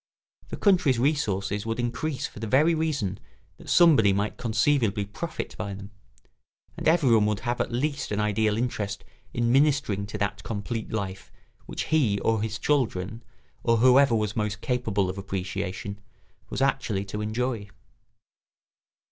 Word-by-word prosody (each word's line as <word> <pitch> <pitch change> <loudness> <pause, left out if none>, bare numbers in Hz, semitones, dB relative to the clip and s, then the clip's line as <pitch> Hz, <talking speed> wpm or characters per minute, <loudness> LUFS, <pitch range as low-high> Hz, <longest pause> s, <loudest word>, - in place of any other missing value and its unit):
The - - -5
country's 180 - +3
resources 105 -8 0
would 115 +1 -2
increase 130 +4 -2
for - - -8
the 110 - -4
very 150 +9 +4
reason 145 - -1 0.4
that - - -12
somebody 145 - +6
might 100 +2 -1
conceivably 115 -3 +1
profit 155 +12 -6
by 100 -2 -3
them; 100 +1 -10 0.8
and - - -3
everyone 130 -10 +4
would 105 -2 -1
have 120 -1 -1
at - - -2
least 140 +3 -2
an 105 - 0
ideal 105 0 +1
interest 105 -5 -2 0.3
in 120 0 0
ministering 135 -8 +2
to 105 - -5
that 100 0 -2
complete 110 +1 -4
life 100 -3 -4 0.4
which - - -3
he 125 -11 +2
or 110 -1 +1
his 110 0 -2
children, 110 -6 0 0.4
or 115 -1 +3
whoever 130 +1 +5
was 105 -1 -1
most 105 -2 -2
capable 110 -5 0
of 95 +2 -4
appreciation, 95 +1 -4 0.5
was - - -1
actually 115 -8 0
to 105 +2 -5
enjoy. 110 -1 -2
110 Hz, 150 wpm, -26 LUFS, 100-130 Hz, 0.8 s, somebody